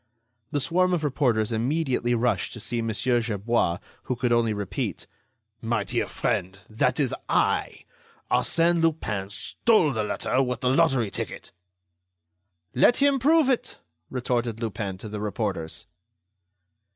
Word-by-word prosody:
The 145 - -1
swarm 180 +5 +2
of 160 - -3
reporters 125 -6 +1
immediately 125 0 0
rushed 120 +1 0
to 115 - -7
see 115 +2 -2
Mon. 115 0 -2
Gerbois, 115 -6 +1 0.3
who 130 - -1
could 125 0 -1
only 115 -1 +3
repeat: 100 -3 -3 0.6
"My 115 -2 0
Dear - - -1
Friend! 95 +2 -2
that 125 +4 0
is 135 -4 +1 0.2
I.... - - 0 0.5
Arsène 170 0 +2
Lupin 110 -12 -1
stole 160 - +2
the 110 -2 -1
letter 130 +4 0
with 125 -2 -2
the 125 - +2
lottery 135 -8 +2
ticket." - - -6 1.2
"Let 185 - +5
him 280 -1 +3
prove 305 +3 +4
it!" 260 -3 -1 0.3
retorted 120 -3 -2
Lupin 105 -4 -4
to 105 - -8
the 105 0 -5
reporters. 100 -6 -3
120 Hz, 135 wpm, -25 LUFS, 110-150 Hz, 1.2 s, Let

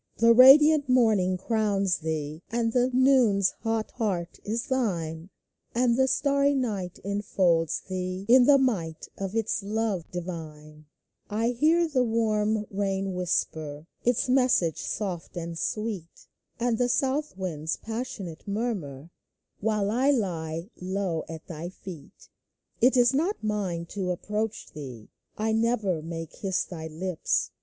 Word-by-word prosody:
The 230 +1 +6
radiant 285 +4 +8
morning 215 -7 +3
crowns 200 -3 0
thee: 155 -1 -4
And 230 0 0
the 250 0 +3
noon's 250 -7 +4
hot 225 -1 -1
heart 185 -7 -3
is 225 +3 -2
thine; 175 - -2 0.5
And 240 -1 +3
the 265 +1 +3
starry 280 +1 +2
night 205 -9 -2
enfolds 190 -5 +1
thee 185 0 -4
In 245 +1 +7
the 285 -1 +7
might 190 -12 -1
of 195 +1 -4
its 225 -1 0
love 205 -3 -2
divine; 155 -4 -8 0.4
1 225 +3 0
hear 325 +7 +3
the 275 -5 +1
warm 220 -2 +1
rain 195 -1 -1
whisper 160 -4 -2 0.2
Its 245 +2 +1
message 250 - +2
soft 185 -4 -4
and 170 0 -4
sweet; 205 -2 -4 0.3
And 235 -1 0
the 245 0 +2
south 270 -3 0
wind's 160 -4 -3
passionate 220 -8 -6
murmur, 185 - -3 0.5
While 210 -1 0
I 255 +5 +2
lie 170 - -1
low 185 -3 -2
at 160 -1 -8
thy 170 +1 -6
feet! 180 -5 -12 0.5
It 255 +2 +5
is 245 +1 +5
not 335 - 0
mine 195 -6 -2
to 190 -2 -3
approach 210 +4 -3
thee; 130 -7 -9 0.3
1 220 +1 0
never 215 -8 0
may 165 +1 -5
kiss 190 +4 -2
thy 160 -3 -7
lips. 165 +2 -1
200 Hz, 135 wpm, -27 LUFS, 170-235 Hz, 0.5 s, radiant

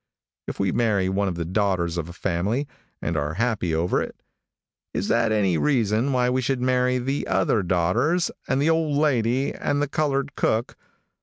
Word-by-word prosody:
If - - -6
we 100 -2 +1
marry 100 -5 +1
one 100 +1 0
of 90 - -2
the 85 -1 -3
daughters 90 -2 0
of 85 -1 -3
a - - -8
family, 100 +11 -1 0.4
and 85 - -1
are 75 +1 -2
happy 105 -6 0
over 85 +3 +1
it, - - -5 0.8
is 100 - -1
that 115 -1 +2
any 95 -6 +2
reason 120 -2 +1
why 125 -1 +2
we 130 +1 +1
should 130 +1 -1
marry 125 0 +2
the 135 +3 -2
other 110 - +2
daughters 90 - +1 0.2
and 130 - +1
the 155 +3 +3
old 160 -3 +1
lady 130 -3 +1
and 145 0 -1
the 145 - +1
colored 140 -1 -1
cook? 110 +2 0
115 Hz, 180 wpm, -24 LUFS, 95-135 Hz, 0.8 s, the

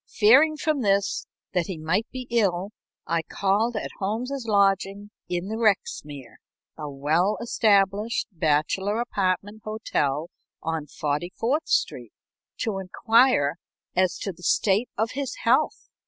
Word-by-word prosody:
Fearing 275 +9 +6
from 305 -3 0
this 200 -2 +1 0.3
that 180 -3 +1
he 185 - -4
might 165 +8 0
be 255 -1 -6
ill, 200 -4 +1 0.3
I 165 0 0
called 205 +7 0
at 215 - -3
Holmes's 235 +6 -3
lodgings 200 0 +1 0.2
in 175 +1 -2
the 220 +2 -3
Rexmere, 150 - -1 0.4
a 150 -1 -6
well 155 +8 +1
established 210 -1 +2
bachelor 165 +6 0
apartment 205 -2 -1
hotel, 165 -8 -2 0.3
on 160 -2 -3
Forty 150 +5 -2
fourth 280 +8 0
Street, - - -1 0.5
to 215 -5 -1
inquire 205 - +3 0.4
as 185 0 +2
to 195 - -4
the 170 - -18
state 200 +6 +2
of 220 +2 0
his 275 - -4
health. - - +2
200 Hz, 130 wpm, -25 LUFS, 175-225 Hz, 0.5 s, Fearing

